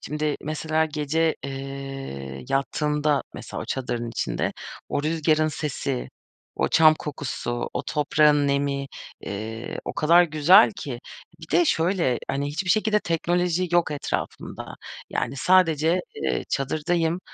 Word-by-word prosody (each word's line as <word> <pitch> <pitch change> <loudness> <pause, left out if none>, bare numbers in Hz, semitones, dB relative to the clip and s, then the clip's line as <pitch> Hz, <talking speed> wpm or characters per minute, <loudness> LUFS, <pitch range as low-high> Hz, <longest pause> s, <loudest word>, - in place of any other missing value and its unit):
Şimdi, 150 0 -2
mesela, 155 +1 0
gece, 155 +1 0
eee, 135 - -6
yattığında 150 +1 +1
mesela, - - -7
o - - -6
çadırın 120 -3 -3
içinde - - -2 0.4
o 145 - -1
rüzgârın 155 0 +2
sesi, 140 -3 -3 0.5
o - - +1
çam 155 -1 +6
kokusu, 130 -5 -4
o - - -1
toprağın 150 0 +3
nemi, 140 0 0 0.4
ııı, 110 +3 -5
o - - -4
kadar 170 +3 +5
güzel 170 +6 +6
ki. 125 -4 -6 0.4
Bir - - -11
de 350 - +5
şöyle: 165 - +1
Hani, 140 +1 -1
hiçbir 185 +5 -2
şekilde 215 -1 +3
teknoloji 175 +1 0
yok 175 -3 +3
etrafımda. 145 -1 -4 0.4
Yani, 140 - -2
sadece, 165 +1 +3 0.3
ııı, - - 0
çadırdayım. 160 +5 0
150 Hz, 125 wpm, -25 LUFS, 135-165 Hz, 0.5 s, çam